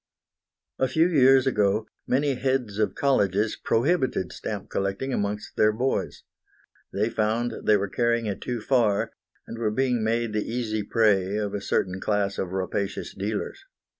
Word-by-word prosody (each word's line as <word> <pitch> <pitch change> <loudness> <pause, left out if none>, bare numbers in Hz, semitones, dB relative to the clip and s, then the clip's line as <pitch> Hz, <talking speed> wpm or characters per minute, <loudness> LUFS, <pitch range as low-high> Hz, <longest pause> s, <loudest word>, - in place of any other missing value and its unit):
A 130 - +3
few 160 +5 +3
years 135 -5 +5
ago 105 -4 +1 0.2
many 140 +2 +2
heads 125 -5 -1
of 105 - +1
colleges 105 -6 +1
prohibited 130 - 0
stamp 105 -2 -6
collecting 100 +7 -2
amongst 105 -1 -3
their 110 0 +5
boys. 125 +5 -2 0.7
They 105 +2 0
found 115 +2 0
they 105 - +6
were 100 0 -2
carrying 120 +2 0
it 100 -2 -3
too 120 -2 -3
far, 110 -5 +2 0.3
and 115 - -8
were 110 -2 +1
being 125 +1 0
made 115 0 0
the 105 -1 0
easy 115 -3 -1
prey 100 -3 +2
of 105 -1 -2
a 100 - -3
certain 95 -1 -1
class 100 -2 0
of 90 - -3
rapacious 95 +1 -3
dealers. 105 - -4
110 Hz, 155 wpm, -25 LUFS, 100-125 Hz, 0.7 s, they